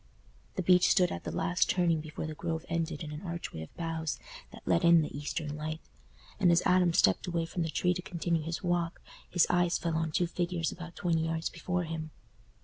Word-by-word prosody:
The 185 - -1
beech 180 0 +5
stood 180 -3 +4
at - - -5
the - - -3
last 175 +1 +1
turning 170 -3 +2
before 155 0 -6
the 155 - -4
Grove 165 +1 -3
ended 165 -2 -2
in 150 - -6
an 150 - -6
archway 170 - -5
of 80 - -11
boughs 165 -2 -2 0.3
that - - -12
let - - +3
in 170 -1 +7
the 150 - -6
eastern 150 +1 -3
light; 155 +1 -4 0.6
and 180 -4 +5
as 170 - +4
Adam 180 -1 +4
stepped 95 - +3
away 170 -2 0
from 170 +2 -4
the 165 - 0
tree 180 +3 +1
to 180 - -4
continue 170 -2 -1
his 165 +4 -4
walk, 175 -1 0 0.3
his 175 - +4
eyes 175 -1 +2
fell 165 -2 -2
on 160 -1 0
two 175 - +2
figures 175 -1 -1
about 175 -1 -9
twenty 165 -2 +1
yards 165 0 -2
before 180 +1 -2
him. 160 -1 -4
165 Hz, 215 wpm, -31 LUFS, 160-175 Hz, 0.6 s, in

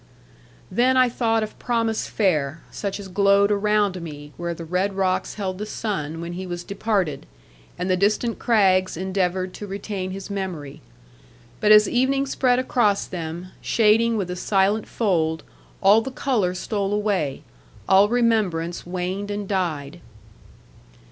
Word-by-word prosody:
Then 255 +6 +3
I 255 -1 +5
thought 225 -2 +1
of 215 - -8
promise 230 -2 -1
fair; 155 -7 0
such 200 0 -4
as 200 - -8
glowed 200 +1 +3
around 205 -2 +1
me, 145 -2 -9
where 170 0 -4
the 165 - -8
red 185 +4 -1
rocks 185 -1 0
held 190 -3 -4
the 210 - -3
sun, 165 -9 -3
when 170 +1 -5
he 185 +1 -5
was 175 0 -5
departed; 195 -7 -2 0.5
and 180 - -2
the 185 - +3
distant 215 +5 0
crags 190 -6 +3
endeavoured 185 0 -1
to 205 - -7
retain 195 -1 -4
his 195 +1 -7
memory. 180 -8 -5 0.8
But 215 - +3
as 210 0 +8
evening 270 +2 +1
spread 255 -2 +2
across 240 -5 +1
them, 170 +1 -6
shading 225 +1 +3
with 185 -3 -2
a - - -3
silent 195 +3 +1
fold, 160 -7 0 0.4
all 205 +3 +6
the 265 - -5
colour 235 -9 0
stole 200 +1 -2
away; 200 -10 -1 0.4
all 195 +2 +5
remembrance 210 -9 0
waned 185 +3 -3
and 205 -1 -4
died. 170 -5 -2
195 Hz, 150 wpm, -23 LUFS, 180-215 Hz, 0.8 s, as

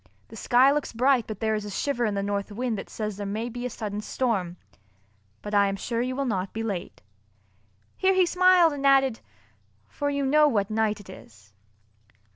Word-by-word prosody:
The - - -11
sky 255 +2 +4
looks 295 -3 -2
bright 250 +1 +2
but 215 -1 -7
there 220 -1 +1
is 210 -1 -2
a 205 - -7
shiver 245 +4 -1
in 210 -2 -1
the 200 - -1
north 200 +1 -3
wind 235 +2 -2
that - - -9
says 210 -2 -5
there 205 - -5
may 220 +4 -3
be 245 +1 -5
a - - -6
sudden 210 -2 -5
storm. 200 -8 -2 0.9
But 205 - -6
I 200 -1 +4
am 195 - -2
sure 230 +4 -3
you 255 +1 -2
will 275 +1 -1
not 195 -5 -2
be 225 - -3
late." 195 -6 -5 0.9
Here 380 0 +2
he 375 -1 +4
smiled 360 -2 +4
and 280 -1 -6
added, 270 -3 +4 0.7
"for 285 -1 -3
you 280 -1 -1
know 300 +2 +5
what 210 -6 0
night 215 -1 0
it 205 - -14
is." 105 - -15
225 Hz, 205 wpm, -26 LUFS, 205-270 Hz, 0.9 s, know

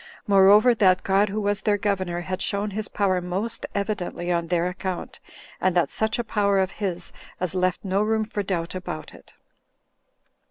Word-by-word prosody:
Moreover, 205 +3 +6
that 185 -4 +3
God, 195 +2 +3
who 210 +2 -2
was 205 -1 0
their 205 -1 +2
Governor, 185 -4 -1
had 185 +1 -4
shown 205 +1 -1
his 210 +2 -3
power 190 -3 0
most 200 +6 -3
evidently 200 -4 -2
on 170 -1 0
their 175 0 +1
account, 185 0 -5 0.4
and 185 -1 +2
that 175 - +2
such 220 0 0
a 240 - -1
power 200 -3 +1
of 190 -1 +1
his 180 -4 -4 0.3
as 185 -1 -1
left 185 +1 0
no 195 +1 +1
room 220 +1 +1
for 210 -1 -3
doubt 180 -4 -2
about 180 - -6
it. - - -17
195 Hz, 175 wpm, -24 LUFS, 180-210 Hz, 0.4 s, Moreover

